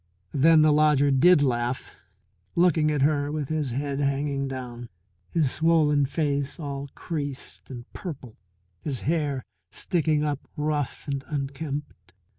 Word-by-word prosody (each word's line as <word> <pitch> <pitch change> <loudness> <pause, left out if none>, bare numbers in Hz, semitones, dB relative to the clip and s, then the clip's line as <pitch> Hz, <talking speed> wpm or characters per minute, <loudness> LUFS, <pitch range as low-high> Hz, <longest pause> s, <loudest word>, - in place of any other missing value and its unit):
Then 155 +2 +6
the 155 - +5
lodger 150 -2 +4
did 145 +3 +6
laugh, 120 -1 -1 0.6
looking 170 -3 +4
at 145 -3 +1
her 145 -1 +2
with 150 -3 -3
his 155 -3 -1
head 140 +3 -2
hanging 140 0 0
down, 120 -3 -6 0.4
his 150 -6 +1
swollen 155 -3 +3
face 145 -1 -1
all 140 -2 -5
creased 145 -5 -5
and 120 -3 -8
purple, 140 - -7 0.5
his 135 -5 -2
hair 145 -5 0 0.3
sticking 155 -4 +1
up 145 -2 -1 0.2
rough 150 -2 -1
and 140 -1 -2
unkempt. 140 - -5
145 Hz, 130 wpm, -26 LUFS, 135-155 Hz, 0.6 s, Then